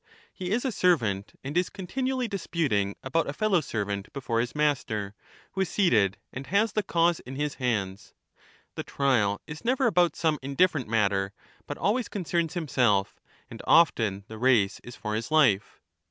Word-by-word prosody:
He 180 -1 -5
is 235 +7 0
a 260 - +1
servant, 115 - +1
and 140 +3 -5
is 180 0 +2
continually 255 +6 -2
dis 200 -4 -5
puting 105 - 0
about 140 +3 0
a - - -3
fellow 195 0 +2
servant 100 -6 -4
before 125 -4 -2
his 120 +3 -2
master, 115 -9 0 0.4
who 190 - -2
is 190 - 0
seated, 110 - +2 0.2
and 135 +2 -7
has 205 +5 +2
the 215 - +1
cause 170 -3 +2
in 130 - -9
his 145 +1 -2
hands; 100 -5 -2 0.6
the - - -4
trial 115 -8 +1
is 150 +4 -9
never 255 +3 +1
about 180 -8 +3
some 155 -3 0
indifferent 140 0 +1
matter, 100 -3 +1 0.3
but - - -5
always 230 +3 0
concerns 170 -4 -2
himself; 125 - +1 0.3
and - - -10
oflen 110 - +3
the 110 0 -9
173 130 +2 +4
race 105 -4 +2
is 120 - -10
for 105 -1 -4
his 110 +5 -3
life. 130 -11 +3
140 Hz, 175 wpm, -27 LUFS, 105-180 Hz, 0.6 s, 173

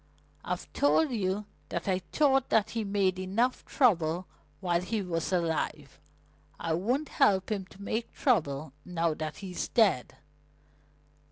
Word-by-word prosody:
"I've - - -3
told 285 +1 +3
you 205 -2 -1 0.2
that - - -3
I 185 -1 +2
thought 270 - +2
that 220 0 +3
he 225 -1 -1
made 195 -2 +1
enough 215 +7 0
trouble 180 - +2 0.3
while 175 -2 +1
he 210 +5 -2
was 165 -1 -2
alive. 170 -3 -1 0.6
I 165 - -1
won't 245 - 0
help 190 0 +3
him 195 -3 -2
to 190 - -17
make 220 +3 -3
trouble 155 - 0
now 170 -2 0
that 155 0 -5
he's 180 -2 -3
dead." 205 - +2
190 Hz, 140 wpm, -29 LUFS, 170-225 Hz, 0.6 s, told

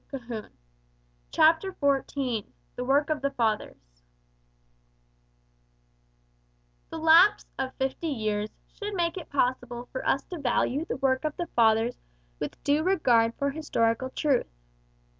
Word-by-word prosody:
150. 235 -5 -7 0.7
CHAPTER 330 +4 +3
XIV 270 - -1 0.3
THE 250 - -3
WORK 285 +4 +2
OF 300 -3 -1
THE 280 - +1
FATHERS 210 - -3 2.9
The - - -6
lapse 330 +6 +6
of 265 -1 -3
fifty 265 +5 -2
years 215 -6 -1 0.2
should 415 -1 -7
make 340 -2 0
it 360 -4 -7
possible 245 -3 -1
for 260 - -4
us 275 - +1
to 350 - -5
value 275 +2 0
the - - -4
work 260 0 +1
of 305 -1 -3
the 350 - -2
Fathers 225 +1 +3 0.4
with - - -6
due 290 +2 +2
regard 245 -11 +3
for 280 0 0
historical 260 -5 0
truth. 275 -2 +1
270 Hz, 125 wpm, -27 LUFS, 235-310 Hz, 2.9 s, lapse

